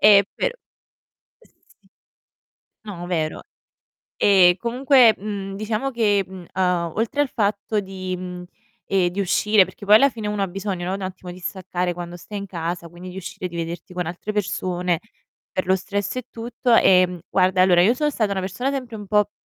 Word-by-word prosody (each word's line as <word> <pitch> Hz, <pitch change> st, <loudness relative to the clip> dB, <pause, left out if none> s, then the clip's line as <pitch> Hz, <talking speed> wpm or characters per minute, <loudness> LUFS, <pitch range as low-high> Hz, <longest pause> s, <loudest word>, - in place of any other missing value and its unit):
E 200 Hz, -1 st, +7 dB
pero -, -, -1 dB, 0.8 s
Sì. -, -, -28 dB, 1.0 s
No, 175 Hz, -4 st, -6 dB
vero. 160 Hz, -3 st, -2 dB, 0.7 s
Ehm, 185 Hz, -3 st, +5 dB
comunque, 245 Hz, 0 st, +4 dB
mhmm, 195 Hz, -1 st, -5 dB
diciamo 215 Hz, +5 st, -2 dB
che, 210 Hz, -5 st, +2 dB
mhmm, 185 Hz, -1 st, -10 dB
a 180 Hz, -3 st, 0 dB
oltre 230 Hz, +6 st, -1 dB
al 280 Hz, -, -3 dB
fatto 210 Hz, 0 st, 0 dB
di, 185 Hz, -1 st, -5 dB
mhmm, 180 Hz, 0 st, -7 dB, 0.5 s
ehm, 185 Hz, -2 st, +3 dB
di 190 Hz, +3 st, -3 dB
uscire, 200 Hz, +2 st, +4 dB
perché 185 Hz, +3 st, -12 dB
poi 210 Hz, -, +8 dB
alla 275 Hz, +5 st, +6 dB
fine 220 Hz, -4 st, -5 dB
uno 210 Hz, -1 st, -1 dB
ha 195 Hz, -, 0 dB
bisogno, 190 Hz, -1 st, -4 dB
no, 190 Hz, -, -1 dB
un 195 Hz, -, -5 dB
attimo 185 Hz, -1 st, -6 dB
di 180 Hz, -, -11 dB
staccare 180 Hz, -1 st, -3 dB
quando 175 Hz, 0 st, -7 dB
stai 205 Hz, +4 st, -7 dB
in 200 Hz, -, -6 dB
casa, 170 Hz, -1 st, -4 dB
quindi 175 Hz, +2 st, -10 dB
di 180 Hz, -, -11 dB
uscire, 190 Hz, -1 st, -5 dB
di 170 Hz, -, -13 dB
vederti 170 Hz, +1 st, -5 dB
con 180 Hz, -1 st, -2 dB
altre 180 Hz, +5 st, -5 dB
persone, 180 Hz, -4 st, -1 dB, 0.5 s
per 185 Hz, -, -2 dB
lo 190 Hz, +1 st, +4 dB
stress 200 Hz, +3 st, -3 dB
e 255 Hz, -, -3 dB
tutto, 235 Hz, +1 st, 0 dB
ehm, 180 Hz, -4 st, +4 dB
guarda, 185 Hz, 0 st, +3 dB
allora 180 Hz, -2 st, +5 dB
io 220 Hz, +7 st, +4 dB
sono 295 Hz, +3 st, 0 dB
stata 215 Hz, -7 st, 0 dB
una 195 Hz, -, -1 dB
persona 195 Hz, +8 st, -2 dB
sempre 250 Hz, -4 st, -4 dB
un 205 Hz, -1 st, -8 dB
po', 210 Hz, 0 st, +2 dB
195 Hz, 185 wpm, -22 LUFS, 180-215 Hz, 1.0 s, poi